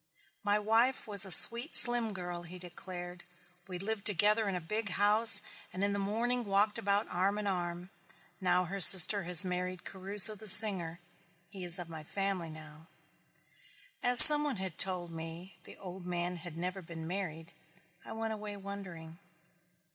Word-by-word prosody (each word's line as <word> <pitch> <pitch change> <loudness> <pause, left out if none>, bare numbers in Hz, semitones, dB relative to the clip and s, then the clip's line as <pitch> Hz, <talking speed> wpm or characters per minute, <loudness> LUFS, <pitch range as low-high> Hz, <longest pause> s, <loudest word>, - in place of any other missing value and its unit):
"My 205 0 -3
wife 225 +5 -3
was 205 -2 +2
a 190 - -9
sweet 235 - +4
slim 240 -2 0
girl," 175 -2 -10
he 175 +1 -14
declared. 175 0 -13 0.4
"We 180 -2 -11
lived 200 +2 -7
together 210 +2 -2
in 190 - -7
a - - -6
big 210 +6 -8
house 210 +3 +3 0.3
and 185 - -8
in 200 0 -4
the 200 - -7
morning 235 +5 -6
walked 205 0 -4
about 200 +1 -5
arm 195 +3 -5
in 210 - -8
arm. 175 -1 -8 0.5
Now 180 -1 -3
her 195 +3 -10
sister 190 +1 +7
has 180 +1 +1
married 180 0 -8
Caruso 195 +2 -1
the 215 +1 -10
singer. 185 -5 +4 0.5
He 190 -2 -11
is 175 +1 -2
of 175 -2 -10
my 160 -2 -13
family 195 0 -7
now." 155 0 -17 1.1
As 245 -1 +5
some 295 -1 +11
one 290 -3 -6
had 185 -3 -9
told 180 -3 -4
me 165 +3 -13
the - - -15
old 185 -1 -14
man 175 0 -7
had 170 -1 -14
never 180 +3 -9
been 165 -1 -13
married 165 -3 -10 0.5
I - - -14
went 225 0 -8
away 210 -1 -12
wondering. 180 -5 -14
190 Hz, 170 wpm, -27 LUFS, 175-210 Hz, 1.1 s, some